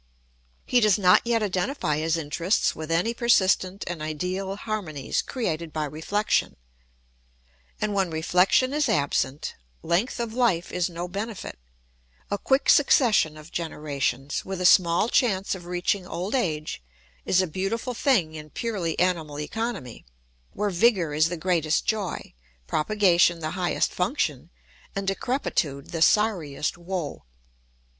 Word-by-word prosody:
He 250 - +3
does 215 -4 +4
not 180 -3 +5
yet 230 -2 +2
identify 185 - -1
his 160 +2 0
interests 165 +5 0
with 155 0 -7
any 175 +8 +1
persistent 195 -5 +2
and 170 -3 -5
ideal 180 +5 -3
harmonies 200 -10 -3
created 170 - -3
by 155 -1 -2
reflection. 160 +8 -1 1.2
And 210 -1 -1
when 195 -3 +1
reflection 180 - +2
is 300 0 +1
absent, 140 -1 0 0.3
length 185 +10 0
of 235 -2 -3
life 225 -9 +1
is 180 0 0
no 175 +1 -5
benefit: 200 - -6 0.7
a 205 - -1
quick 270 +1 +1
succession 225 - +4
of 155 +2 -13
generations, 145 -4 -2
with 190 -1 -5
a 180 - -1
small 175 +2 +5
chance 200 -6 +1
of 180 -2 -8
reaching 180 +1 -1
old 185 +4 -4
age, 155 - -1 0.4
is 185 - +2
a 185 - +3
beautiful 195 +9 -3
thing 225 - +2
in 155 -1 -9
purely 190 -5 -3
animal 165 -5 0
economy, 195 - -4 0.5
where 205 0 -1
vigour 180 -4 +2
is 155 +2 +3
the 175 - -4
greatest 160 -2 +1
joy, 210 -4 -2 0.3
propagation 175 - +3
the 155 -1 -3
highest 180 -1 0
function, - - -1 0.5
and 195 0 -2
decrepitude 195 - -1
the 165 - -3
sorriest 165 -7 +2
woe. 175 -3 -5
180 Hz, 135 wpm, -25 LUFS, 160-210 Hz, 1.2 s, not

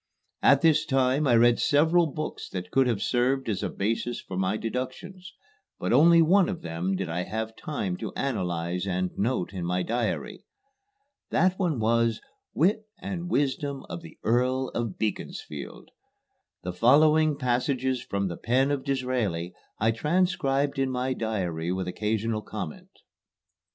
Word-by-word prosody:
At 140 0 +5
this 155 -2 +4
time 135 0 +2
I 120 - +5
read 120 +1 +5
several 160 +4 +4
books 155 +1 -5
that 90 0 -6
could 135 -1 +3
have 115 -5 0
served 130 +2 +1
as 100 -4 -1
a - - -1
basis 115 +4 -2
for 95 - -8
my 95 +3 0
deductions, 130 - -5 0.5
but - - -1
only 170 +1 +7
one 185 +4 +4
of 185 -4 -5
them 85 +3 -2
did 95 -1 -3
I 85 +2 -2
have 110 +4 -4
time 105 -12 -3
to 110 -4 -5
analyze 90 -7 -2
and 90 -1 -1
note 100 -3 -1
in 90 -2 -4
my 90 +1 0
diary. 125 - -2 0.9
That 185 +1 +2
one 170 -7 +1
was, 115 0 +2 0.4
"Wit 210 +6 +2
and 180 -2 -5
Wisdom 140 -2 -1
of 85 - -5
the 80 - -13
Earl 125 +3 +1
of 115 -5 -3
Beaconsfield." 85 -8 -5 0.7
The 90 - -4
following 150 - +4
passages 130 0 0
from 100 -3 -2
the 85 - -5
pen 130 +4 +1
of 140 -2 -1
Disraeli 125 - -1 0.2
I 110 +2 +2
transcribed 145 -1 0
in 135 -1 +1
my 130 0 -1
diary 90 -8 -2
with 95 0 -2
occasional 110 +3 -1
comment. - - -7
125 Hz, 150 wpm, -27 LUFS, 100-145 Hz, 0.9 s, only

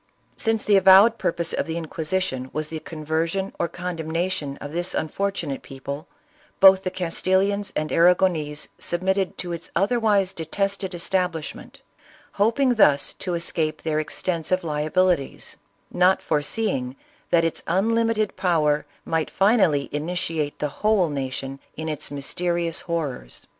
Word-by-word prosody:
Since 225 -1 0
the 205 -2 +5
avowed 195 +5 +7
purpose 170 0 -1
of - - -1
the 165 +1 -3
Inquisition 160 -4 -2
was 155 0 -3
the 160 - -5
conversion 165 +5 -2
or - - +1
condemnation 165 -3 -3
of 145 - -7
this 175 +3 -2
unfortunate 170 -4 -2
people, 140 +4 -7 0.5
both 190 0 +8
the 185 - -1
Castilians 190 +3 0
and 155 0 -2
Arragonese 170 -4 +2
submitted 190 +2 -1
to 175 - -4
its 170 - -7
otherwise 205 -3 +2
detested 195 +3 -2
establishment, 175 -2 -3 0.6
hoping 245 +4 +3
thus 150 -11 +4
to 180 -2 -3
escape 165 -2 -1
their 155 -1 0
ex 155 - -5
tensive 185 +1 0
liabilities; 155 0 0 0.3
not 180 +1 +3
foreseeing 145 - -1 0.3
that 170 -1 +4
its 165 - -2
unlimited 220 +3 +1
power 150 -5 +1 0.2
might 160 -1 -1
finally 190 -9 +3
initiate 155 -1 -2
the 150 - -1
whole 210 -5 +3
nation 135 0 -4 0.2
in 160 +1 -4
its 155 -2 -3
mysterious 170 +4 -2
horrors. 150 - -4
170 Hz, 130 wpm, -24 LUFS, 155-190 Hz, 0.6 s, both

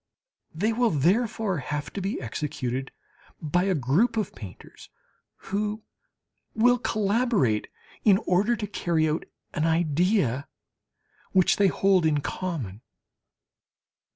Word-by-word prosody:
They 210 +8 0
will 240 +1 +2
therefore 195 - +1
have 145 +2 -4
to 200 - -4
be 195 +2 -2
executed 130 0 -4 0.5
by 175 +4 0
a 190 -2 +1
group 165 - +2
of 215 -4 -1
painters, 95 -5 -12 0.5
who 210 +2 -3 0.7
will 245 +2 +4
collaborate 210 - +1 0.4
in 200 -3 +6
order 200 +6 +2
to 215 -2 -4
carry 170 -5 0
out 155 +1 -1 0.3
an 155 - 0
idea 165 - +1 0.9
which 185 -2 +4
they 200 - +4
hold 190 -3 +3
in 150 -2 +1
common. 140 - -4
180 Hz, 115 wpm, -26 LUFS, 150-210 Hz, 0.9 s, in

